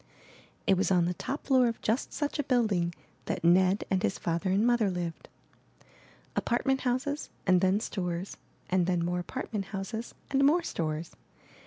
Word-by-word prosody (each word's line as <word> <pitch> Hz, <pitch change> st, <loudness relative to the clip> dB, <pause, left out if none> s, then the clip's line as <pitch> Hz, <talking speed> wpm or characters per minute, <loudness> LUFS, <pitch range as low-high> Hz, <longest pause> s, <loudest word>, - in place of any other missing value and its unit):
It 195 Hz, -, +4 dB
was 190 Hz, -, +1 dB
on 180 Hz, -3 st, +4 dB
the 175 Hz, -, 0 dB
top 270 Hz, -, -5 dB
floor 260 Hz, -3 st, +4 dB
of 230 Hz, -, -2 dB
just 225 Hz, +5 st, -1 dB
such 290 Hz, 0 st, -2 dB
a -, -, +2 dB
building 210 Hz, -10 st, +1 dB, 0.3 s
that -, -, -3 dB
Ned 185 Hz, +3 st, +4 dB
and 190 Hz, -1 st, +2 dB
his 100 Hz, -, 0 dB
father 170 Hz, +3 st, -1 dB
and 200 Hz, +4 st, +3 dB
mother 240 Hz, -4 st, +3 dB
lived. 175 Hz, -2 st, -4 dB, 1.1 s
Apartment 265 Hz, +2 st, +1 dB
houses 265 Hz, +4 st, -1 dB, 0.2 s
and 185 Hz, -2 st, +4 dB
then 190 Hz, +2 st, +3 dB
stores, 180 Hz, -3 st, -3 dB, 0.4 s
and 180 Hz, -2 st, +3 dB
then 175 Hz, -2 st, +1 dB
more 180 Hz, +1 st, -1 dB
apartment 210 Hz, +1 st, -4 dB
houses 200 Hz, +4 st, -5 dB, 0.2 s
and 275 Hz, 0 st, +3 dB
more 325 Hz, +5 st, +4 dB
stores. 160 Hz, -, -3 dB
195 Hz, 165 wpm, -29 LUFS, 180-245 Hz, 1.1 s, It